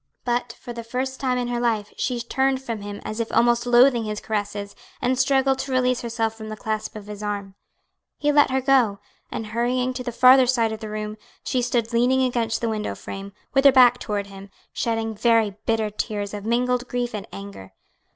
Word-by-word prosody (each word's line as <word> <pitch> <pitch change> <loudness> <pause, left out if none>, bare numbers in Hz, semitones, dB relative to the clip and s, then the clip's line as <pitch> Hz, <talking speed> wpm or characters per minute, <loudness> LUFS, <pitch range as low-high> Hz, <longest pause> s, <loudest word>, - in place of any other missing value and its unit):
But 240 -1 -1
for 240 - -8
the 235 0 -6
first 260 +3 -3
time 255 -2 0
in 245 -1 -2
her 240 -1 -1
life 225 -4 -1
she 250 -2 -1
turned 265 +2 0
from 230 -5 -5
him 205 0 -6
as 215 - -4
if 230 - -2
almost 235 0 +3
loathing 245 -1 +5
his 210 0 -3
caresses, 205 -1 -4 0.2
and 250 +1 +1
struggled 265 0 +2
to 275 - -4
release 255 -1 +2
herself 230 -2 -1
from 220 -1 -9
the 215 - -6
clasp 215 0 -3
of 210 -2 -8
his 210 0 -8
arm. 200 -2 -4 0.6
He 295 0 +1
let 290 -1 +5
her 265 0 +1
go, 250 -6 +3 0.3
and 225 - -4
hurrying 245 +3 0
to 250 0 -5
the 245 - -3
farther 255 +2 +6
side 235 -3 +2
of 220 - -5
the 220 -1 -7
room, 215 0 -5 0.3
she 255 - 0
stood 235 -1 -1
leaning 250 +3 +3
against 235 -3 0
the 230 - 0
window 215 -1 -3
frame, 195 0 -8 0.2
with 270 -1 +4
her 280 - +8
back 245 -2 +6
toward 205 -2 -3
him, 195 0 -11 0.2
shedding 225 -1 -1
very 220 -2 +2
bitter 220 -2 +1
tears 205 -1 -3
of 205 +1 -6
mingled 250 +1 +1
grief 245 -1 -2
and 210 0 -5
anger. 200 - -9
235 Hz, 210 wpm, -23 LUFS, 215-250 Hz, 0.6 s, her